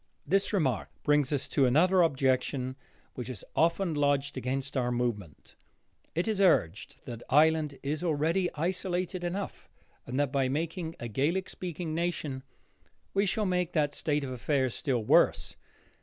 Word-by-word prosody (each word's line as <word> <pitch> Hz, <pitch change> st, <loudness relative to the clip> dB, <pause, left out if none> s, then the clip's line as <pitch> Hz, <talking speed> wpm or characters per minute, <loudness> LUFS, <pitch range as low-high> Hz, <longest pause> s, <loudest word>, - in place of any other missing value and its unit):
This 195 Hz, +1 st, +1 dB
remark 140 Hz, -, 0 dB
brings 145 Hz, -2 st, +3 dB
us 140 Hz, -2 st, 0 dB
to 135 Hz, -3 st, +3 dB
another 180 Hz, +8 st, +4 dB
objection 130 Hz, -3 st, +1 dB, 0.4 s
which 125 Hz, -1 st, -6 dB
is 120 Hz, -7 st, -7 dB
often 170 Hz, +2 st, +2 dB
lodged 145 Hz, -1 st, +1 dB
against 130 Hz, +1 st, -3 dB
our 125 Hz, -2 st, +1 dB
movement. 115 Hz, -, -3 dB, 0.6 s
It 170 Hz, +5 st, 0 dB
is 215 Hz, -3 st, 0 dB
urged 110 Hz, -, +2 dB
that 120 Hz, -2 st, -7 dB
Ireland 150 Hz, 0 st, +3 dB
is 150 Hz, +4 st, -2 dB
already 165 Hz, +3 st, +1 dB
isolated 180 Hz, +2 st, -2 dB
enough, 190 Hz, +3 st, -4 dB, 0.4 s
and 125 Hz, +3 st, -2 dB
that 145 Hz, -3 st, +1 dB
by 135 Hz, -2 st, +1 dB
making 165 Hz, +3 st, -2 dB
it -, -, -21 dB
a 120 Hz, -, -3 dB
Gaelic 155 Hz, -, 0 dB
speaking 175 Hz, -2 st, -5 dB
nation, 160 Hz, -5 st, -2 dB, 0.7 s
we 200 Hz, +1 st, +2 dB
shall 210 Hz, +3 st, 0 dB
make 180 Hz, -2 st, 0 dB
that 145 Hz, -3 st, +1 dB
state 150 Hz, -2 st, -1 dB
of 130 Hz, -, -4 dB
affairs 130 Hz, 0 st, 0 dB
still 130 Hz, -7 st, -1 dB
worse. -, -, +3 dB
150 Hz, 155 wpm, -29 LUFS, 130-175 Hz, 0.7 s, another